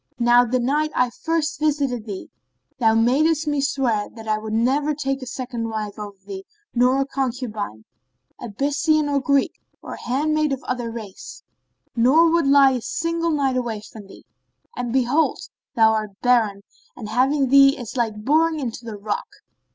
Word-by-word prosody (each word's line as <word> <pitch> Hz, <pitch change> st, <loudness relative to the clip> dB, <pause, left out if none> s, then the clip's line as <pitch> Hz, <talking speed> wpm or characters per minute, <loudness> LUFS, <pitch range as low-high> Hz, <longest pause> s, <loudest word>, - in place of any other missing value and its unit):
Now 240 Hz, 0 st, +5 dB
the 250 Hz, +2 st, 0 dB
night 290 Hz, +5 st, 0 dB
I 250 Hz, -1 st, +2 dB
first 315 Hz, +2 st, -2 dB
visited 280 Hz, -7 st, -1 dB
thee,[FN#27] 130 Hz, -, -12 dB
thou 225 Hz, -2 st, +3 dB
madest 300 Hz, +8 st, +2 dB
me 290 Hz, -2 st, 0 dB
swear 245 Hz, -7 st, 0 dB
that 225 Hz, -1 st, -10 dB
I 215 Hz, 0 st, 0 dB
would 215 Hz, 0 st, -7 dB
never 270 Hz, +7 st, +1 dB
take 270 Hz, -1 st, -2 dB
a 255 Hz, -, -7 dB
second 240 Hz, -2 st, -4 dB
wife 215 Hz, -1 st, -5 dB
over 205 Hz, -1 st, -8 dB
thee 195 Hz, -1 st, -7 dB, 0.3 s
nor 255 Hz, +2 st, +3 dB
a -, -, 0 dB
concubine, 240 Hz, -, -4 dB, 0.6 s
Abyssinian 290 Hz, +6 st, 0 dB
or 280 Hz, -1 st, +1 dB
Greek 275 Hz, +1 st, +2 dB, 0.3 s
or -, -, -8 dB
handmaid 305 Hz, +3 st, 0 dB
of 265 Hz, -, -5 dB
other 245 Hz, -2 st, -3 dB
race; 230 Hz, -, -9 dB, 0.5 s
nor 290 Hz, +8 st, +4 dB
would 335 Hz, -4 st, +2 dB
lie 275 Hz, -1 st, +6 dB
a 250 Hz, -2 st, -2 dB
single 335 Hz, +5 st, -2 dB
night 280 Hz, -4 st, 0 dB
away 235 Hz, -4 st, -2 dB
from 210 Hz, -1 st, -12 dB
thee: -, -, -15 dB, 0.5 s
and 245 Hz, -1 st, -3 dB
behold, 265 Hz, +5 st, +2 dB, 0.4 s
thou 220 Hz, -2 st, +5 dB
art 215 Hz, -2 st, -3 dB
barren, 220 Hz, -5 st, +2 dB, 0.3 s
and 220 Hz, -, -8 dB
having 265 Hz, +3 st, +2 dB
thee 275 Hz, +2 st, +6 dB
is 245 Hz, -3 st, -8 dB
like 220 Hz, -3 st, -2 dB
boring 315 Hz, +2 st, +2 dB
into 240 Hz, -3 st, -5 dB
the 225 Hz, -3 st, -7 dB
rock." 205 Hz, 0 st, -3 dB
250 Hz, 165 wpm, -22 LUFS, 220-285 Hz, 0.6 s, lie